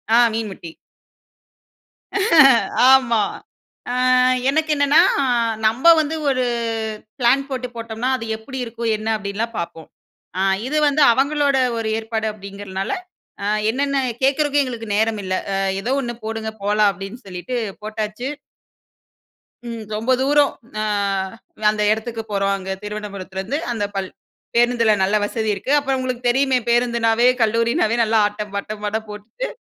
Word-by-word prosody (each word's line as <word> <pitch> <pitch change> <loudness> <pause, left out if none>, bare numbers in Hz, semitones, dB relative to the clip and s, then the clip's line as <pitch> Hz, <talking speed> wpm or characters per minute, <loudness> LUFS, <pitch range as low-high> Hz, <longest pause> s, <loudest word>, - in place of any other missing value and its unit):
ஆ - - +6 0.2
மீன் 220 -1 -2
முட்டி. 170 -3 -10 2.2
ஆமா. 235 -5 +4 0.7
அ - - -2 0.6
எனக்கு 315 +3 +1
என்னன்னா, 285 +2 +4 0.7
நம்ப 250 +9 +1
வந்து 310 +1 -3
ஒரு 255 -2 +1 0.8
பிளான் 260 +3 +3
போட்டுப் 250 -2 -4
போட்டோம்னா, 230 +2 -3
"அது 230 - -6
எப்படி 265 +4 -9
இருக்கும்? 230 0 -4
என்ன?" 215 +1 -7
அப்படின்லாம் 215 +3 -4
பார்ப்போம். 165 -1 -6 0.5
அ - - +1 0.3
இது 305 - -1
வந்து 290 +1 +2
அவங்களோட 280 +1 +2 0.2
ஒரு 225 -1 -2
ஏற்பாடு 220 0 -3
அப்டிங்கிறதுனால, 195 -1 -6 0.5
அ - - -2 0.3
என்னென்ன 275 +3 -1 0.3
கேக்குறதுக்கும் 290 +1 +2
எங்களுக்கு 235 -4 -6
நேரமில்ல. 210 -4 0 0.2
"அ - - 0 0.3
எதோ 250 +5 -1
ஒண்ணு 240 -2 -4
போடுங்க, 220 0 -4
போலாம்." 210 0 +3
அப்படீன்னு 195 +6 -9
சொல்லிட்டு 185 +7 -5 0.3
போட்டாச்சு. 215 +3 -4 1.4
ம் 230 -1 -6
ரொம்ப 225 +4 -1
தூரம் 285 +1 +4 0.3
அ - - 0 0.9
அந்த 210 0 -1
எடத்துக்கு 225 +1 -2
போறோம், 195 0 +1
அங்க 190 -1 -7
திருவனபுரத்துலருந்து. 205 +2 -5
அந்த 225 -3 -2
பள் 195 -1 -2 0.5
பேருந்துல 240 -1 +3
நல்ல 200 +3 +1
வசதி 220 +1 -2
இருக்கு. 255 - -4
அப்பறம் 270 -2 0
உங்களுக்குத் 250 -1 -2
தெரியுமே 265 +1 +2
பேருந்துனாவே, 235 -1 +2
கல்லூரினாவே 230 0 +2
நல்ல 225 0 0
ஆட்டம் 210 0 -4
,பாட்டம், 210 +1 -5
அட 220 +2 -1
போட்டுட்டு, 210 - -6
225 Hz, 130 wpm, -20 LUFS, 210-255 Hz, 2.2 s, ஆ